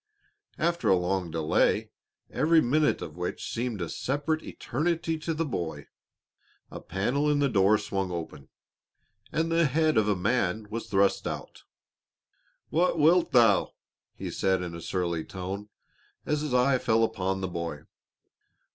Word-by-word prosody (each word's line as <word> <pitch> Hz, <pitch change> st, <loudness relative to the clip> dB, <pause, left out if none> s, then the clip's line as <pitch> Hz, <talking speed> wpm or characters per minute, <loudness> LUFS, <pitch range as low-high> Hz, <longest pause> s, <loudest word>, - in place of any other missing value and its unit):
After 170 Hz, +1 st, 0 dB
a 95 Hz, -, +6 dB
long 90 Hz, 0 st, -1 dB
delay, 80 Hz, -1 st, +1 dB, 0.4 s
every 160 Hz, +5 st, +4 dB
minute 150 Hz, +3 st, +2 dB
of 75 Hz, -, -8 dB
which 90 Hz, 0 st, -4 dB
seemed 115 Hz, -4 st, -2 dB
a -, -, -3 dB
separate 145 Hz, -, -2 dB
eternity 165 Hz, +5 st, -2 dB
to 160 Hz, +2 st, -3 dB
the 165 Hz, +1 st, -1 dB
boy, 80 Hz, -, -4 dB, 0.8 s
a -, -, -7 dB
panel 125 Hz, -, 0 dB
in 145 Hz, -, +2 dB
the 145 Hz, -1 st, +3 dB
door 105 Hz, -3 st, +4 dB
swung 95 Hz, -2 st, -3 dB
open, 85 Hz, -2 st, -6 dB, 0.8 s
and 165 Hz, +1 st, 0 dB
the 165 Hz, 0 st, +3 dB
head 155 Hz, 0 st, +2 dB
of 110 Hz, -1 st, +3 dB
a 105 Hz, -, +2 dB
man 105 Hz, +1 st, 0 dB
was 115 Hz, +1 st, -4 dB
thrust 100 Hz, 0 st, +2 dB
out. -, -, -7 dB, 1.1 s
"What 170 Hz, +1 st, +2 dB
wilt 165 Hz, +3 st, +4 dB
thou?" 115 Hz, -5 st, +4 dB, 0.4 s
he -, -, -5 dB
said 95 Hz, -1 st, +1 dB
in 85 Hz, -1 st, -5 dB
a 85 Hz, -, -7 dB
surly 85 Hz, -2 st, -2 dB
tone, 95 Hz, +4 st, -6 dB, 0.6 s
as 150 Hz, -1 st, 0 dB
his 150 Hz, -2 st, -3 dB
eye 125 Hz, +1 st, +3 dB
fell 115 Hz, -1 st, +2 dB
upon 95 Hz, -3 st, -1 dB
the 95 Hz, -, -1 dB
boy. 85 Hz, -4 st, -5 dB
110 Hz, 150 wpm, -28 LUFS, 90-150 Hz, 1.1 s, a